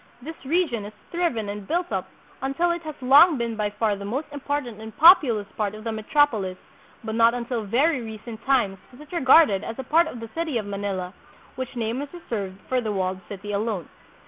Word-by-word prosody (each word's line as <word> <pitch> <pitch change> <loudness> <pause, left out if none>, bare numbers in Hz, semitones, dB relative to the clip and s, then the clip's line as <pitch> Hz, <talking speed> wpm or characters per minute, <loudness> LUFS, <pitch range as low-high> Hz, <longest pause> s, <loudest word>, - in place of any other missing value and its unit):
This 320 +6 -9
region 280 - 0
has 210 - -9 0.2
thriven 335 -12 -1
and 205 -1 -6
built 350 +1 -1
up - - -2 0.3
until 275 +6 +1
it 340 0 -2
has 310 -2 -7
long 285 +5 +7
been 235 -1 -2
by 210 -1 -1
far 210 0 0
the 200 - -8
most 255 +10 -3
important 285 -6 -4
and 220 -1 -10
populous 295 - +7
part 210 -1 -2
of 215 - -10
the 225 - -2
metrop 290 +7 +2
olis, 190 -5 -4 0.5
but 220 -1 -4
not 230 +1 +4
until 240 -1 -3
very 260 +7 +2
recent 220 0 -8
tunes 235 -8 +1
was 250 - -16
it 300 - -14
regarded 265 - +5
as 225 - -6
a 265 - -4
part 325 +5 +3
of 245 - -7
the 230 0 -8
city 325 -6 -1
of 215 - -3
Manila, 200 -2 -4 0.4
which 260 0 -6
name 230 +1 -2
was 285 0 -6
reserved 205 - -5
for 255 -1 +1
the 220 -3 -2
walled 190 -1 -1
city 205 +1 -6
alone. 205 -4 -2
235 Hz, 210 wpm, -24 LUFS, 210-290 Hz, 0.5 s, long